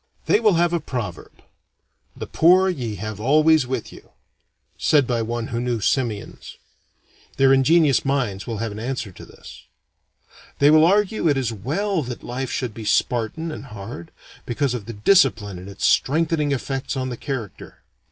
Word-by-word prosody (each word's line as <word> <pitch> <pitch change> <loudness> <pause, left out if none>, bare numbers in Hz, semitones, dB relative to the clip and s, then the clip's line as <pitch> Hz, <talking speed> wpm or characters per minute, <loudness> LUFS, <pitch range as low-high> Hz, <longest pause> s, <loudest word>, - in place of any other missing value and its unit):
They - - +3
will 215 -3 +3
have 170 +1 +2
a 170 - +1
proverb, 120 - -7 0.7
"The - - -5
poor 185 +3 +4
ye 120 - -3
have 105 +1 -6
always 155 +3 +3
with 130 -3 -4
you," - - -15 0.7
said 145 -3 +3
by 120 -1 -1
one 115 +1 -3
who 115 0 -2
knew 120 -2 -1
simians. 110 -1 -2 0.8
Their 135 0 +5
ingenious 145 +1 +4
minds 125 -8 -2
will 115 -2 -3
have 115 +1 -3
an 105 - -7
answer 120 -3 -4
to - - -13
this. - - -13 1.0
They 145 +1 +5
will 155 +1 +6
argue 210 0 +2
it 145 -3 +2
is 125 -4 -1
well 165 - -2
that 125 -3 -7
life 130 +2 -4
should 125 -4 -3
be 110 - -8
Spartan 120 +8 0
and 150 - -8
hard, 100 -7 -9 0.4
because 125 +2 -1
of 115 -4 -6
the 115 - -6
discipline 105 - +2
and 90 +2 -10
its 100 - -4
strengthening 155 0 +2
effects 135 0 -3
on 130 0 -2
the 125 - -4
character. 120 -5 -7
130 Hz, 170 wpm, -22 LUFS, 115-155 Hz, 1.0 s, will